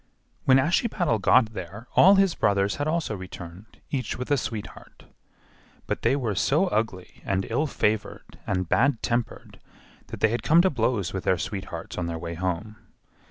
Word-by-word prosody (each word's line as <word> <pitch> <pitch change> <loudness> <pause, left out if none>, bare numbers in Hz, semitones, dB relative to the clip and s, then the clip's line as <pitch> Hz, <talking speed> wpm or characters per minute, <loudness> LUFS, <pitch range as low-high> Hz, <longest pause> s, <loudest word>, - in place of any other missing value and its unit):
When 130 -1 +6
Ashiepattle 170 - +1
got 115 +1 +4
there 100 +5 -8
all 195 +2 +7
his 195 -3 +3
brothers 100 -1 +1
had 145 - -2
also 155 -8 -1
returned, 95 +1 -10
each 130 -5 -2
with 125 +3 -5
a - - +5
sweetheart; 110 -4 -7 0.8
but - - -3
they - - +2
were 120 -7 -1
so 145 - +2
ugly 105 - -3
and 95 0 -1
ill 155 +2 +1
favored 110 -6 -2
and 95 -2 -1
bad 135 +6 +2
tempered 120 -1 -3 0.5
that - - -8
they 110 - +3
had 120 +2 -1
come 165 +3 +5
to 190 - +3
blows 115 - -1
with 95 - -4
their 95 - +3
sweethearts 95 -1 -5
on 85 - -2
their 85 -1 -3
way 85 +1 -5
home. 95 +5 -3
110 Hz, 170 wpm, -25 LUFS, 95-135 Hz, 0.8 s, all